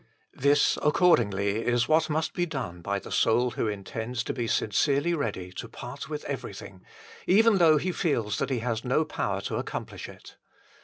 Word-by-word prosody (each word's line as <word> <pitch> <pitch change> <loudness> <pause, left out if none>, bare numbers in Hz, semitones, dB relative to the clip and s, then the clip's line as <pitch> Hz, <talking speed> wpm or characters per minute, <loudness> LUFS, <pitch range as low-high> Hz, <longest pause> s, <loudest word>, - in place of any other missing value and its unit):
This, 140 +1 +3
accordingly, 110 - +2
is 120 -1 +1
what 155 +1 +3
must 155 +1 -1
be 175 0 -1
done 125 - -5
by 100 +4 -1
the - - -9
soul 120 +2 +2
who 115 - -2
intends 110 +4 -4
to - - -3
be 120 -3 -3
sincerely 140 +11 +1
ready 95 - -3
to - - -7
part 125 +5 -8
with 150 -1 -5
everything, 100 -8 -7 0.4
even 210 +1 +5
though 160 -3 +6
he 185 +5 -1
feels 115 - -1
that 135 - -1
he 125 -4 -1
has 115 -2 -2
no 135 +5 +1
power - - -2
to - - -3
accomplish - - -5
it. - - -14
125 Hz, 175 wpm, -27 LUFS, 110-155 Hz, 0.4 s, though